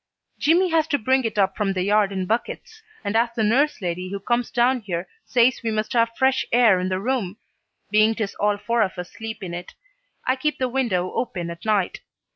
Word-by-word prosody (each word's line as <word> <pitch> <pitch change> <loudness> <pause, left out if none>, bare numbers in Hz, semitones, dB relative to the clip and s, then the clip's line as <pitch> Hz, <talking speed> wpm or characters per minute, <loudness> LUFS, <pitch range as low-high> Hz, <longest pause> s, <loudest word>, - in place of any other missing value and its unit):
Jimmy 345 +5 +3
has 325 -1 +2
to 295 -3 +1
bring 260 +1 +1
it 220 -1 -3
up 195 -1 +2
from 200 -2 0
the 185 -1 -1
yard 205 0 +2
in 190 -1 -2
buckets, 440 - -3 0.2
and 200 +1 -2
as 230 +1 +3
the 225 - 0
nurse 250 +2 +2
lady 180 +1 -3
who 200 +1 -4
comes 240 +4 -1
down 250 +1 +2
here 175 -3 -4 0.2
says 245 0 +3
we 230 - 0
must 215 +3 -2
have 230 -1 +1
fresh 265 0 +3
air 230 -6 +5
in 185 +1 -2
the 185 0 -1
room, 215 -4 -2 0.5
being 215 +1 +4
'tis 215 -3 -3
all 205 0 +2
four 230 +3 0
of 190 -3 0
us 180 0 -6
sleep 220 -2 -7
in 175 -2 -5
it, 175 +1 -7 0.5
I 255 +1 +1
keep 300 +3 -1
the 255 - 0
window 225 -9 0
open 175 -8 -3
at 170 +3 -10
night. 210 -4 +1
220 Hz, 220 wpm, -23 LUFS, 195-250 Hz, 0.5 s, air